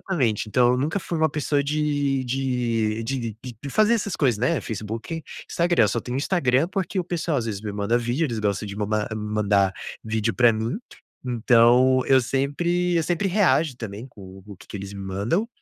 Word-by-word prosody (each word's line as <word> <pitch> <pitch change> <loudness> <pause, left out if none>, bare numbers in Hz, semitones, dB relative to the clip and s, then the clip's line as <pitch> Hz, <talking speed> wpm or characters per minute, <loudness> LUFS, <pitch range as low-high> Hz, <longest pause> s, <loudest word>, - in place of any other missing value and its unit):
Exatamente, 115 - +1
então 120 +3 +3
eu - - +1
nunca 155 +8 0
fui 170 - -4
uma 160 0 +3
pessoa 145 -1 0
de 145 -2 0
de 120 -4 -1
de 135 +4 -2 0.2
de 125 -2 -8
de 140 - -5
fazer 215 - +4
essas 205 -4 -2
coisas, 125 -7 +2
né. 125 +5 +1
Facebook, 115 - -5 0.3
Instagram, 170 -8 +3
eu - - +2
só 120 - -1
tenho 125 +2 -4
Instagram, 140 -1 +1
porque 195 0 -2
o - - -4
pessoal 165 -3 -1
às 115 - -3
vezes 105 -3 -3
me 105 -2 -4
manda 100 +3 0
vídeo. 120 +7 0
Eles 115 -5 -3
gostam 105 -1 -1
de 100 0 -7
ma 105 0 -1
mandar 105 -2 +1 0.3
vídeo 110 0 -1
pra 120 -2 +5
mim, 110 - -2 0.5
então 125 +2 +4
eu 135 -1 +5
sempre 170 +8 0
eu 165 - +2
sempre 175 +4 0
reajo 175 -7 +2
também 110 0 -7
com 95 -6 -13
o 100 -2 -10
que - - -16
que - - -6
eles 100 0 -7
me 100 - -7
mandam, 100 - -1
125 Hz, 200 wpm, -24 LUFS, 110-150 Hz, 0.5 s, pra